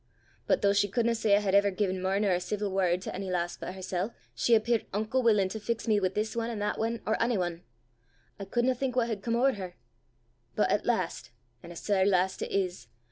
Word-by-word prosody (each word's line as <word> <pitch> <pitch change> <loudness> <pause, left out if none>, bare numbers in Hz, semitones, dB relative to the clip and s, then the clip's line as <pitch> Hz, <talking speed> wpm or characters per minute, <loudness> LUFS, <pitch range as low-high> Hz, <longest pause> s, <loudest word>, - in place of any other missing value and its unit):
But - - +2
though 200 0 +4
she 205 0 +3
couldna 235 +3 +1
say 220 -3 +3
I 205 - +2
had 195 -2 -1
ever 200 0 +5
gi'en 190 -1 -1
mair 190 +1 +1
nor 205 -2 +2
a 180 - +2
ceevil 200 +3 -3
word 185 -1 +1
to - - -5
ony 190 0 -4
lass 175 -1 -1
but 185 - -7
hersel', 190 +3 -3 0.2
she 235 - +3
appeart 230 +1 0
unco 215 +5 0
wullin' 215 -6 +3
to 220 - -5
fix 230 +2 -3
me 215 -2 +3
wi' 190 - +2
this 210 +4 -3
ane 230 0 -1
an' 230 - -4
that 205 0 -2
ane 230 0 -2
or 220 - 0
ony 230 -1 +2
ane! 175 -1 -2 0.8
I 200 - -5
couldna 240 +6 +1
think 255 0 -3
what 240 -2 +1
had 215 -3 -3
come 230 +2 -1
ower 265 +3 +4
her! 185 -3 -7 0.8
But - - +2
at - - 0
last 125 - -1 0.3
an' 170 - -11
a - - -10
sair 195 +2 +1
last 190 -1 +2
it - - -3
is! 185 -2 -2
205 Hz, 240 wpm, -29 LUFS, 185-230 Hz, 0.8 s, ever